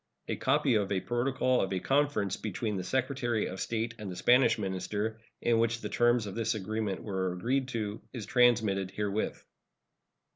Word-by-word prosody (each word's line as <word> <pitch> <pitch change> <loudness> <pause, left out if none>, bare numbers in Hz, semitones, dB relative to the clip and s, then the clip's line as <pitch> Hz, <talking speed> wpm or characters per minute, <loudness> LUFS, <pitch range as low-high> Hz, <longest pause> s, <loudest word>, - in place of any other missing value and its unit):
A - - -1
copy 140 0 +2
of 105 -3 +1
a 95 - +2
protocol 125 +4 +1
of 95 - -1
a 95 - 0
conference 135 -5 +1
between 105 +1 -3
the 95 - -3
Secretary 120 0 0
of 95 - -5
State 115 0 -2
and 105 -2 -5
the 90 - -6
Spanish 120 +5 +4
minister, 105 +2 -3 0.2
in 115 -1 +3
which 115 0 +1
the - - -4
terms 120 -1 +3
of 100 - -5
this 115 +1 0
arrangement 105 -1 -3
were 95 -3 -1
agreed 125 +9 0
to, 110 -4 -3
is 115 -5 -6
transmitted 110 -6 +3
herewith. 105 +2 -2
110 Hz, 175 wpm, -30 LUFS, 100-120 Hz, 0.2 s, Spanish